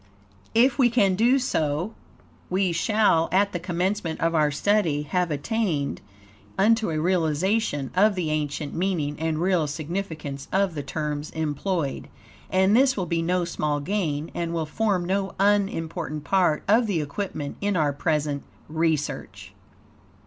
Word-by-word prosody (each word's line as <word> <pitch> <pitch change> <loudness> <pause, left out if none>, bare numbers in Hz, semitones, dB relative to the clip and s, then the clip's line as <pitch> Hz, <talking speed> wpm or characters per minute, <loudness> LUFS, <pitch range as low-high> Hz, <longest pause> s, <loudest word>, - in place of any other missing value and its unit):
If 245 +2 +4
we 245 -2 +5
can 210 -5 +3
do 235 +7 +4
so, 165 - -1 0.6
we 185 0 +1
shall, 170 -2 +2
at 200 +3 +3
the 175 - -3
commencement 180 0 -2
of 165 0 +1
our 155 -2 +3
study, 155 -1 +1
have 180 +3 0
attained 155 -1 -1 0.6
unto 220 +1 +3
a 155 -1 -1
realization 165 - 0
of 200 +2 +4
the 170 -4 -1
ancient 150 -1 -2
meaning 165 -5 -1
and 160 -1 -1
real 175 -3 +2
significance 155 -2 -5
of 195 -2 +1
the 150 - -3
terms 150 +1 -4
employed. 160 0 -2 0.4
And 190 +2 +3
this 265 0 +4
will 185 - -1
be 165 0 -1
no 175 +1 +1
small 150 -3 -1
gain, 160 -3 -2
and 170 -1 -3
will 160 -1 -1
form 190 +2 0
no 195 +1 -1
unimportant 170 -6 0
part 175 -2 +2
of 225 +3 +4
the 190 -6 0
equipment 150 -1 -4
in 200 -2 0
our 150 -3 +2
present 150 -1 -1 0.3
research. 160 -1 -2
170 Hz, 145 wpm, -25 LUFS, 150-195 Hz, 0.6 s, we